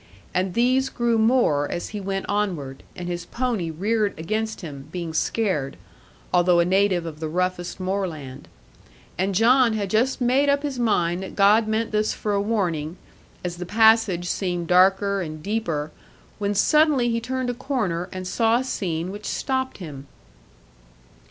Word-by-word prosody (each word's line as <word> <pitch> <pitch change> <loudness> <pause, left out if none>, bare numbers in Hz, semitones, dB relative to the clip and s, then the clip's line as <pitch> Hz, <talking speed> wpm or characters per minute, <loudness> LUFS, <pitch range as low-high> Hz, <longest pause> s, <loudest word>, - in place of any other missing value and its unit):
And 185 0 -1
these 255 +3 +2
grew 235 -3 0
more 220 - +2
as 175 - -4
he 210 -1 -5
went 195 0 -3
onward, 175 -10 -2
and 175 - -6
his 175 -1 -4
pony 235 -9 -2
reared 205 +6 -1
against 215 +7 -3
him, 140 -5 -8
being 170 -2 -4
scared, 160 -6 -1 0.6
although 175 -1 +4
a 170 - +4
native 190 -1 +2
of 155 -2 -7
the 160 - -3
roughest 180 +2 -2
moorland. 170 -8 -4 0.7
And 190 +1 0
John 235 +3 +5
had 200 -3 -2
just 250 +5 +1
made 260 +3 +3
up 280 +1 +2
his 275 -4 -3
mind 180 -6 +1
that 190 - -7
God 210 +2 +5
meant 220 +1 -1
this 215 0 0
for 210 - -2
a 200 - +1
warning, 180 -7 -1 0.5
as 175 -1 -4
the 180 - -5
passage 220 -4 +4
seemed 175 -2 -2
darker 190 +3 +3
and 155 -3 -6
deeper, 165 -8 -2 0.5
when 205 0 -1
suddenly 290 +2 +4
he 230 - 0
turned 255 +1 -2
a - - -5
corner, 210 -10 -2
and 185 -1 -6
saw 225 +4 +2
a 255 - -1
scene 175 -8 -3
which 205 +1 -7
stopped 260 -1 -2
him. 145 -7 -9
195 Hz, 165 wpm, -23 LUFS, 175-225 Hz, 0.7 s, John